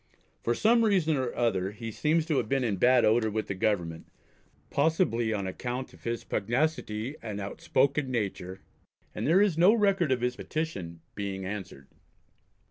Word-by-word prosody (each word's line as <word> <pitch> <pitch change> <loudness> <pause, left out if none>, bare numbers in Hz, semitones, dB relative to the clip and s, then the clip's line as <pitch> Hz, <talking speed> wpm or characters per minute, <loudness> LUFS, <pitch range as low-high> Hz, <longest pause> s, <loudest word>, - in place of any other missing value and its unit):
For 120 - 0
some 230 - +4
reason 185 -8 +3
or 130 -3 -1
other 95 -6 +1
he 115 +1 -6
seems 155 +7 +1
to 155 -4 0
have - - -1
been 135 -1 +1
in 105 -5 0
bad 125 +4 +5
odour 110 +1 +3
with 110 +1 -2
the - - -3
Government 90 -5 -1 0.6
possibly 145 -7 +1
on 100 -3 -2
account 125 +7 -4
of - - -18
his 115 0 -2
pugnacity 120 +1 -1
and 105 -3 -5
outspoken 135 +7 0
nature 95 -5 -3 0.5
and 110 - -3
there 185 +6 +5
is 180 -6 +1
no 190 +6 +6
record 195 - +2
of 125 -2 +1
his 125 0 0
petition 95 - -4
being 95 -2 -4
answered. 95 -9 -7
120 Hz, 165 wpm, -28 LUFS, 100-155 Hz, 0.6 s, no